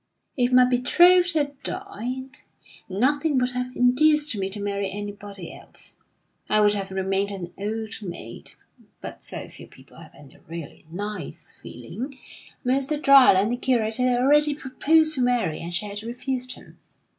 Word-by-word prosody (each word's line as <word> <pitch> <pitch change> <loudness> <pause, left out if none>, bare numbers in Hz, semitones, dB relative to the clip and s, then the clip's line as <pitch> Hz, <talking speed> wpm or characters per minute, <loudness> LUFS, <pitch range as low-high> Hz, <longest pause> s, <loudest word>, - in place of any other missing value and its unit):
"If 245 -1 +1
my 250 0 +7
betrothed 345 +9 +5
had 285 -2 -1
died, 260 - -5 0.5
nothing 280 - +1
would 250 0 +1
have 250 0 -4
induced 295 +3 +3
me 195 -1 -2
to 205 +2 -7
marry 200 -1 -2
anybody 205 -2 -7
else. - - -12 0.5
I 215 - +3
would 210 -1 +4
have 200 -1 -3
remained 190 +1 -1
an 180 -3 -7
old 220 +2 -4
maid. 170 - -8 0.5
But - - -9
so - - -8
few - - -12
people - - -18
have - - -14
any 140 -2 -16
really 165 -2 -9
nice 205 +5 -7
feeling! 265 +3 -8 0.5
Mr. 275 +4 +1
Dryland, 250 -8 +6
the 245 - -1
curate, 230 -4 0
had 250 -1 +2
already 295 +3 +4
proposed 310 +3 +2
to 265 - -1
Mary, 245 -10 +1
and 170 - -6
she 180 +4 -2
had 205 0 -6
refused 250 +2 -4
him. - - -17
245 Hz, 155 wpm, -24 LUFS, 200-270 Hz, 0.5 s, my